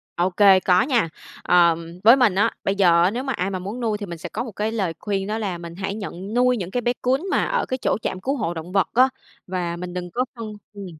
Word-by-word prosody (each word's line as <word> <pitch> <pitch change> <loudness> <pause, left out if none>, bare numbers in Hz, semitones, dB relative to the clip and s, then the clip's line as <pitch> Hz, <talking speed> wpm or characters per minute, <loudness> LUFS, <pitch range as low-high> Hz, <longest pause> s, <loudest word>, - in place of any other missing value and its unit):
OK, 180 +1 0 0.3
có 180 +3 +5
nha. 245 - +1 0.3
Ờm, 170 0 +2
với 230 +4 +8
mình, 245 -8 +3
á, 210 +4 +3
bây 195 - 0
giờ 175 -3 +4
á, 185 - +3
nếu 245 +4 -3
mà 270 - -2
ai 185 -3 -2
mà 190 -2 -3
muốn 200 +7 -6
nuôi 220 -3 -1
thì 205 - -6
mình 170 -2 -7
sẽ - - -7
có 230 - -3
một 235 - -7
cái 210 +3 -2
lời 195 -7 -1
khuyên 195 -2 -2
đó 215 +1 -2
là 195 -5 -3
mình 170 0 -9
hãy 195 +1 -3
nhận 200 -1 -7
nuôi 250 +1 +3
những 185 -3 -5
cái 245 - -1
bé 240 +1 +1
cún 260 +4 +1
mà - - +2
ở - - 0
cái 260 - -3
chỗ - - +1
trạm 185 - -3
cứu 275 +7 -1
hộ 175 -9 -2
động 165 +2 -7
vật 190 -4 +2
á. 255 +3 +5 0.4
Và 180 -2 -2
mình 175 0 -7
đừng 180 -1 -5
có 250 +6 0
phân 220 -2 -7 0.2
ừm, 200 -1 -8
200 Hz, 275 wpm, -22 LUFS, 180-230 Hz, 0.4 s, với